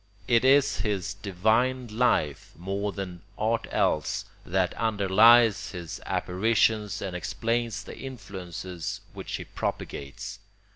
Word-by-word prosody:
It 115 0 +4
is 135 +1 +5
his 105 -2 -1
divine 110 +6 +1
life, 105 - 0
more 100 +4 -2
than 90 -3 -6 0.2
aught 115 +1 0
else, 75 - 0 0.2
that 90 0 0
underlies 110 0 +5
his 85 -3 -6
apparitions 105 +2 +1
and 95 -2 -4
explains 115 +4 -1
the - - -9
influences 95 - -6
which - - -5
he - - -5
propagates. 70 -1 -5
105 Hz, 110 wpm, -27 LUFS, 90-115 Hz, 0.2 s, is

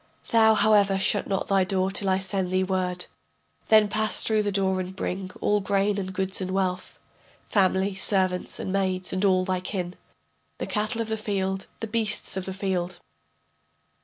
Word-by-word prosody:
] - - -21
Thou, 220 -1 +6
however, 205 -3 +4
shut 195 +1 +1
not 195 -1 -1
thy 195 -1 +3
door 190 0 0
till 195 0 -1
I 190 - +3
shall 190 - -4
send 190 -1 -1
thee 185 +1 +1
word. 185 -1 -1 0.6
Then 215 -1 +6
pass 215 -1 0
through 220 -1 +2
the 205 -1 -1
door 190 -1 +1
and 185 0 -5
bring 190 0 -3
All 210 0 +2
grain 200 +1 +1
and 190 -1 -4
goods 190 +1 -2
and 185 - -3
wealth, 185 -1 -2 0.5
Family, 190 0 +2
servants 185 -2 0
and 190 - -3
maids 185 -2 -1
and 185 +1 -1
all 185 -2 +3
thy 185 -1 0
kin, 180 -1 -4 0.6
The - - -3
cattle 215 +2 -1
of 225 - -4
the 220 - -1
field, 195 -2 -2
the - - -1
beasts 220 -2 -1
of 190 -1 -3
the 190 - -4
field. 185 -2 -2
190 Hz, 190 wpm, -26 LUFS, 185-205 Hz, 0.6 s, Thou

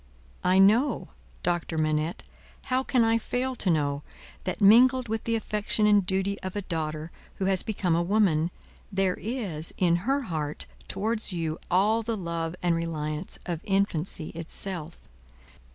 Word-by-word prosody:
I 185 +1 +4
know, 215 +9 +4 0.3
Doctor 175 -2 -1
Manette 155 +1 0 0.5
how 260 - +3
can 255 -2 +2
I 225 0 +3
fail 255 +3 -2
to 195 - 0
know 145 -3 +1 0.4
that, - - -2
mingled 250 +5 +6
with 225 +1 -3
the 230 - +1
affection 210 -1 0
and 205 -1 +5
duty 190 +2 -1
of 185 +1 -5
a 205 - -2
daughter 155 -2 -3 0.2
who 190 - -2
has 190 -1 +4
become 190 -5 -1
a 170 - +3
woman, 175 -4 +2 0.4
there 190 -1 +1
is, 200 -10 -4
in 170 -2 +3
her 270 +10 0
heart, 155 - -3 0.2
towards 215 +1 0
you, 165 -2 -2
all 210 +5 +3
the 225 0 -3
love 170 -2 -3
and 175 -1 +3
reliance 155 0 -2
of 170 -3 -3
infancy 195 -5 0
itself. 165 0 -2
190 Hz, 150 wpm, -27 LUFS, 165-215 Hz, 0.5 s, mingled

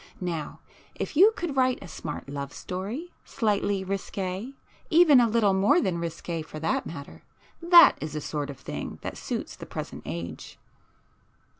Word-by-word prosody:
Now 170 -5 -4 0.3
if - - -4
you 390 +8 +7
could 335 -5 -3
write 255 -1 +3
a 195 - -10
smart 155 -3 -6
love 140 0 -5
story, 215 - -5
slightly 205 -4 0
risqué,—even 225 - +1
a 240 - +5
little 215 -3 +3
more 205 - +4
than 180 - 0
risqué 170 0 -4
for 155 0 -9
that 160 - -1
matter; 140 -4 -9 0.4
that 340 -1 +8
is 155 -1 -4
the 150 - -3
sort 145 -1 -3
of 140 - -7
thing - - -6
that - - -4
suits - - -4
the - - -10
present - - -6
age." 85 -1 -6
190 Hz, 155 wpm, -27 LUFS, 155-260 Hz, 0.4 s, that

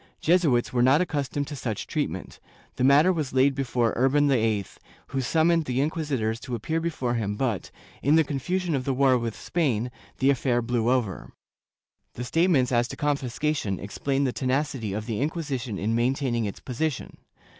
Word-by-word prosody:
Jesuits 155 -10 +2
were 125 - +2
not 130 +4 +5
accustomed 145 -4 -1
to 145 - -7
such 115 -6 -4
treatment; - - -4 0.4
the - - -1
matter 145 +7 +6
was 155 -6 -3
laid 135 +1 +4
before 125 -4 0
Urban 135 +4 +3
VIII, 110 -6 +1 0.4
who 135 0 -1
summoned 160 +5 +2
the 125 -1 -1
inquisitors 140 -8 -1
to 125 -1 -5
appear 160 +9 -2
before 155 -7 -2
him 105 -4 -1
but, 115 -5 -2 0.3
in 145 +4 +4
the 160 - +5
confusion 170 +5 -2
of 135 -3 0
the 135 0 -1
war 135 -1 +4
with 115 -3 -2
Spain, 125 -8 -1 0.3
the 135 +1 +4
affair 125 -2 +1
blew 120 -1 0
over/ 120 -8 -1 0.8
The 125 - -4
statements 145 -1 +2
as 120 -1 +2
to - - -7
confiscation 140 -6 -1
explain 135 +8 -2
the 130 -3 0
tenacity 130 -4 -1
of 105 +2 -3
the 115 0 -3
Inquisition 140 - -2
in 110 +4 -1
maintaining 120 -1 0
its 100 - -6
position. 135 +3 -3
130 Hz, 170 wpm, -26 LUFS, 120-145 Hz, 0.8 s, matter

